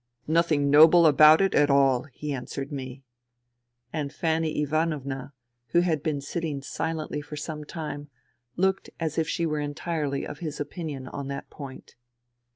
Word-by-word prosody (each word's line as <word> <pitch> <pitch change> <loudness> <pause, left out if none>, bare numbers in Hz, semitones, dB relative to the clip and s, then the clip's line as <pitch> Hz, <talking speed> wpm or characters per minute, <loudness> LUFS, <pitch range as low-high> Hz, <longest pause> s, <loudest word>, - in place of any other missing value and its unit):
" - - -52
Nothing 155 -3 +2
noble 160 +3 +8
about 155 +2 +7
it 195 - +2
at 145 0 +4
all! 135 -2 +4
" - - -33
he 150 -1 -4
answered 135 +2 -5
me. 135 -1 -6 0.9
And 150 -3 -2
Fanny 160 -1 -1
Ivanovna, 145 -3 -2 0.4
who 175 - +5
had 165 -5 0
been 145 -3 -2
sitting 150 -1 -4
silently 160 0 -3
for 150 +1 -9
some 150 +1 -5
time, 145 -2 -6 0.5
looked 190 +1 0
as 160 -1 -1
if 160 - 0
she 170 - 0
were 155 -2 -1
entirely 145 -1 -2
of 145 - -8
his 155 -3 -5
opinion 145 -3 -5
on 140 0 -6
that 140 0 -6
point. 140 -3 -10
150 Hz, 160 wpm, -26 LUFS, 140-160 Hz, 0.9 s, noble